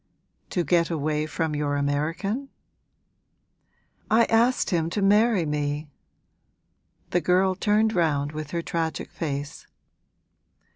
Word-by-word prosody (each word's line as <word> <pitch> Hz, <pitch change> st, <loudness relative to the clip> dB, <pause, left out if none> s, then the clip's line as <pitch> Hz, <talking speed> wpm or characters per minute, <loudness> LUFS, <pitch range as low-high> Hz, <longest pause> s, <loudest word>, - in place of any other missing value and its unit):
'To 175 Hz, -, 0 dB
get 170 Hz, -1 st, +2 dB
away 155 Hz, -1 st, -1 dB
from 160 Hz, 0 st, -2 dB
your 145 Hz, -1 st, -1 dB
American?' 165 Hz, -, -1 dB, 1.6 s
'I 230 Hz, +2 st, +5 dB
asked 235 Hz, +2 st, +2 dB
him 165 Hz, -2 st, +1 dB
to 205 Hz, -, -2 dB
marry 205 Hz, -1 st, +3 dB
me!' 150 Hz, 0 st, -2 dB, 1.2 s
The 175 Hz, -, +2 dB
girl 185 Hz, +3 st, +3 dB
turned 210 Hz, +3 st, +2 dB
round 150 Hz, -6 st, +1 dB
with 155 Hz, -1 st, -6 dB
her 170 Hz, +1 st, -3 dB
tragic 165 Hz, -2 st, -3 dB
face. 145 Hz, -2 st, -5 dB
165 Hz, 110 wpm, -25 LUFS, 150-195 Hz, 1.6 s, I